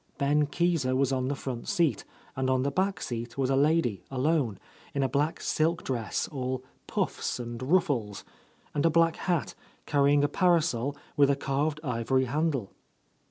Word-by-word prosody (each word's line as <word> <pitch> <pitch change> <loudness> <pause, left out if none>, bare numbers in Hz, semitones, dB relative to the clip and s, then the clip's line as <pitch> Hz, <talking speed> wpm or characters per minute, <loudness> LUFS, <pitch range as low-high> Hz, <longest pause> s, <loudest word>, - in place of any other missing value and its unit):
Ben 145 +1 +2
Keezer 155 -4 +1
was 135 0 +2
on 130 -1 0
the 140 - -1
front 130 -3 -5
seat, 165 -4 +1 0.3
and 130 0 0
on 130 0 +2
the 140 - 0
back 190 +5 0
seat 120 0 -5
was 135 -1 +1
a - - +3
lady, 140 - +2
alone, 135 - +1 0.4
in 140 - +1
a - - +2
black 145 +4 0
silk 165 +2 0
dress 120 -4 -2
all 130 -2 -3 0.2
pufFs - - -2
and 120 0 -6
ruffles, 130 - +1 0.5
and 145 - 0
a 165 - +5
black 165 0 +3
hat, 170 -9 -1 0.3
carrying 145 0 +3
a - - +4
parasol 150 -6 +2 0.2
with 140 -1 +5
a 140 - +3
carved 145 +3 -1
ivory 130 0 +1
handle. 140 -5 -1
140 Hz, 165 wpm, -28 LUFS, 130-155 Hz, 0.5 s, a